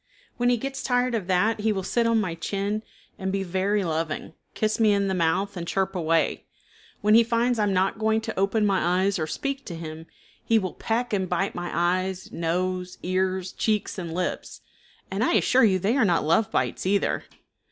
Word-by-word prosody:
When 245 0 +2
he 245 - +3
gets 270 +3 -4
tired 250 -1 +1
of 210 -6 -2
that 205 +5 +2
he 215 +1 +1
will 190 -2 -2
sit 230 +5 +1
on 230 -1 +3
my 185 -5 -1
chin 200 +5 -2 0.4
and 190 0 -2
be 195 0 -1
very 190 +3 0
loving, 160 -2 -3 0.2
kiss 215 +1 0
me 215 -2 +5
in 200 -1 +1
the 190 - 0
mouth, 185 +3 0
and 170 -2 -5
chirp 195 +1 0
away. 165 -2 0 0.5
When 210 +1 +4
he 230 +1 +8
finds 235 +1 +1
I - - +3
am 200 - +1
not 190 +3 +1
going 220 0 +2
to 220 -3 -4
open 205 +2 +2
my 185 -2 +2
eyes 200 -1 +1
or 155 - -1
speak 275 - -3
to 170 - -5
him 160 0 -8 0.4
he 225 - +3
will 190 -4 -1
peck 235 +1 -2
and 190 -3 0
bite 190 +2 0
my 175 0 -4
eyes, 185 +2 -1
nose, 180 +2 -2
ears, 185 0 -1
cheeks, 210 -3 -1
and 170 -3 -5
lips, 180 +2 -3 0.5
and - - 0
I - - +2
assure 260 - +4
you 190 -3 +3
they 200 +7 +1
are 265 - +4
not 175 -5 +2
love 200 +8 +3
bites 185 - -1
either. 200 +1 +1
195 Hz, 205 wpm, -25 LUFS, 180-220 Hz, 0.5 s, he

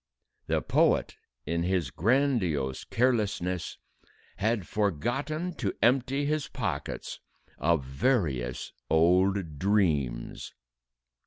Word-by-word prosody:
The - - 0
poet, - - +2 0.3
in 85 0 -1
his 90 -1 0
grandiose 95 - +1
carelessness, 105 -8 0 0.6
had 105 -1 0
forgotten 125 - -1
to 100 -7 -2
empty 130 +4 +2
his 155 0 0
pockets - - -4 0.4
of 80 -1 +2
various 65 - -1 0.2
old 90 -1 +3
dreams! 75 - 0
95 Hz, 85 wpm, -28 LUFS, 80-120 Hz, 0.6 s, old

